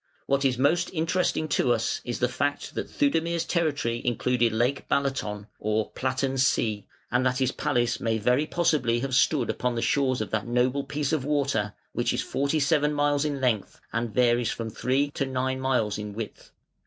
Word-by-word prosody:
What 140 0 +1
is 130 -3 +2
most 165 +7 +2
interesting 165 -1 0
to 130 -3 +2
us 115 -1 -1
is 120 - -3
the 125 - +2
fact 145 +3 -2
that - - -4
Theudemir's 165 +3 +1
territory 145 -9 0
included 120 0 +1
Lake 120 +5 0
Balaton 130 -7 -1
(or 110 0 -1
Platten 130 +1 -1
See), 110 -5 +1 0.2
and 125 +1 +2
that 125 0 +1
his 130 -1 +1
palace 120 -3 0
may 115 -1 0
very 125 +7 +2
possibly 140 -10 +1
have 135 0 -3
stood 135 0 +3
upon 125 -1 -2
the 115 - -1
shores 130 -3 +1
of 110 - -4
that 110 +1 -1
noble 125 +3 +1
piece 145 +1 -2
of 155 -5 +1
water, 135 -8 0 0.2
which 120 0 0
is 125 - -1
forty 140 +3 0
seven 150 0 +2
miles 145 0 +2
in 145 -2 -2
length 120 -6 -1
and 115 -1 -1
varies 120 -1 +2
from 115 -1 -4
three 135 +6 0
to 140 -2 -2
nine 130 0 -1
miles 125 -6 0
in 105 -1 -5
width. 110 -2 -7
130 Hz, 185 wpm, -26 LUFS, 120-145 Hz, 0.2 s, stood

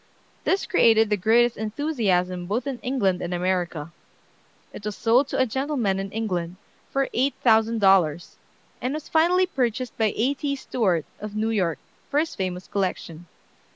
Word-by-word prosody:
This 385 - +1
created 225 - +4
the - - +4
greatest 230 +4 +3
enthusiasm 210 - -1
both 225 +6 -1
in 270 -3 -4
England 200 -9 0
and 175 0 -3
America. 175 -3 -2 0.8
It - - -9
was 210 -1 -4
sold 245 +4 +3
to - - -3
a 260 - +3
gentleman 255 -6 -1
in 195 0 -5
England 180 -6 -3 0.3
for 275 0 0
eight 265 +3 +1
thousand 225 -1 +3
dollars, 175 -5 +3 0.4
and 255 +4 -2
was 305 - -6
finally 350 +3 +3
purchased 255 - -2
by 220 -2 +3
A. 255 +6 +1
T. 280 0 -2
Stewart, 195 - 0
of 210 0 -7
New 220 +1 0
York, 180 -7 0 0.3
for 285 - -1
his 320 +1 -1
famous 185 -1 -4
collection. 175 -4 -3
220 Hz, 160 wpm, -24 LUFS, 185-260 Hz, 0.8 s, created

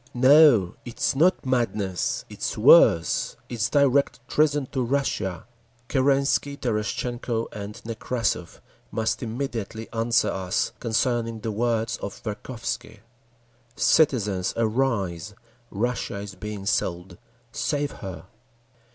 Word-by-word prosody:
No! 130 - +6
It 120 - -9
is - - +1
not 170 +4 +3
madness! 110 -7 -1
It - - -12
is - - -2
worse. 85 0 +5
It 120 -2 -5
is 100 - +2
direct 140 -1 +2
treason 145 -1 +2
to 130 - -1
Russia! 115 -9 -1 0.4
Kerensky, 140 +1 +1
Terestchenko 115 0 -2
and 105 0 -7
Nekrassov 115 -5 -3 0.3
must 110 0 -1
immediately 115 -3 -4
answer 115 +1 +2
us 95 -1 -1
concerning 115 -1 -1
the 110 - -3
words 115 +1 0
of 100 - -7
Verkhovsky. 115 0 -5 0.7
Citizens, 105 - +2
arise! 110 -6 -1 0.3
Russia 115 0 -2
is 100 0 -7
being 100 +1 -7
sold! 90 -2 -2 0.3
Save 145 +2 -1
her! 90 -4 -7
115 Hz, 110 wpm, -25 LUFS, 100-130 Hz, 0.7 s, No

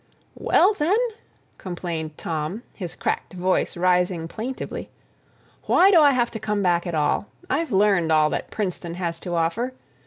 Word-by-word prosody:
"Well, 390 +4 +3
then," 365 +3 +2 0.6
complained 170 -4 -5
Tom, 165 +7 -3
his 180 -5 -6
cracked - - -2
voice 185 0 0
rising 180 -1 +1
plaintively, 235 +8 -5 0.8
"why 380 +3 +6
do 340 -5 +7
I 290 - +7
have 245 -3 +1
to 225 - -5
come 210 -1 -1
back 175 -1 +2
at 170 - -2
all? 150 +6 +1 0.2
I've 315 +5 0
learned 195 -5 +3
all 155 -1 +4
that - - -3
Princeton 180 -4 -3
has 170 -2 -3
to 175 0 -4
offer. 190 +10 0
180 Hz, 155 wpm, -24 LUFS, 170-235 Hz, 0.8 s, do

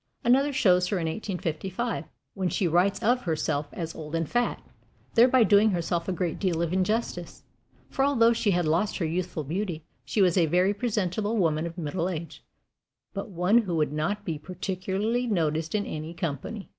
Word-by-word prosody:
Another 270 +4 +4
shows 180 -10 +3
her 195 - 0
in 170 - -2
1855, 190 +4 -3 0.3
when 190 -2 -1
she 185 - 0
writes 185 +6 +2
of 245 +3 +3
herself 155 -4 -1
as 165 -2 -5
"old 155 0 -6
and 165 -1 -1
fat" 240 0 0 0.5
thereby 245 +1 +6
doing 205 +2 +5
herself 170 -2 -1
a - - +1
great 175 -2 -2
deal 170 -4 0
of 170 +1 -2
injustice; 185 -2 -1 0.4
for 270 - -1
although 235 -5 +4
she 230 -2 0
had 175 -3 +2
lost 170 +7 +1
her 175 - -1
youthful 170 0 -2
beauty, 165 +1 -3 0.2
she - - -2
was 180 0 +3
a 170 -3 +4
very 180 +5 +3
presentable 210 -1 -1
woman 160 -3 +1
of 170 +1 -9
middle 170 +2 -2
age, 170 -2 -6 0.7
but 195 +2 -5
one 185 +5 +3
who 190 -7 -2
would 150 -2 0
not 165 +8 -2
be 160 -3 -3
particularly 190 +7 -2
noticed 160 -4 0
in 205 - 0
any 155 +2 -6
company. 165 - -4
180 Hz, 180 wpm, -27 LUFS, 165-210 Hz, 0.7 s, thereby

